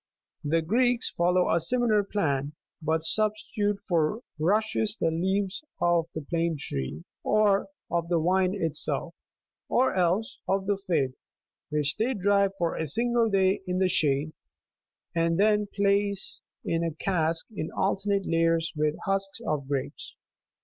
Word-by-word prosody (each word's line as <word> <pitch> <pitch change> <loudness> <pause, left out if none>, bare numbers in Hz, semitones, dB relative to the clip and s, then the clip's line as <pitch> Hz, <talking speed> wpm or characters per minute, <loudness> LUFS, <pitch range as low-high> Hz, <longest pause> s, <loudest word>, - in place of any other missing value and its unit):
The 160 +2 +1
Greeks 245 +7 +2
follow 180 +1 +2
a 170 - +3
similar 220 +3 +2
plan, 145 -8 -1 0.3
but 160 0 0
substitute 210 +1 +1
for 170 +4 +1 0.2
rushes 215 +5 +1
the 165 - +1
leaves 190 - -1 0.2
of 170 -1 +2
the 155 - -3
plane 165 +1 -1
tree, 75 - -3 0.2
or 210 -2 +2 0.2
of 170 -1 -1
the 175 - +2
vine 185 +3 +2
itself, 165 -6 0 0.6
or 255 +2 +2
else 185 +4 0
of 195 0 0
the 200 0 0
fig, 145 -7 +1 0.6
which 150 -1 0
they 245 +4 0
dry 200 0 +3
for 170 -2 0
a 160 - -2
single 235 - +2
day 195 -1 +2
in 180 0 -1
the 190 0 +3
shade, 150 -3 +1 0.8
and 165 +1 +1
then 210 0 +3
place 200 0 +1 0.2
in 165 0 0
a 165 -2 -2
cask 165 -2 0
in 155 - -3
alternate 200 0 0
layers 165 0 +1
with 150 0 0
husks41 195 +3 -2
of 145 -5 -2
grapes. 140 -2 -4
180 Hz, 145 wpm, -27 LUFS, 160-205 Hz, 0.8 s, a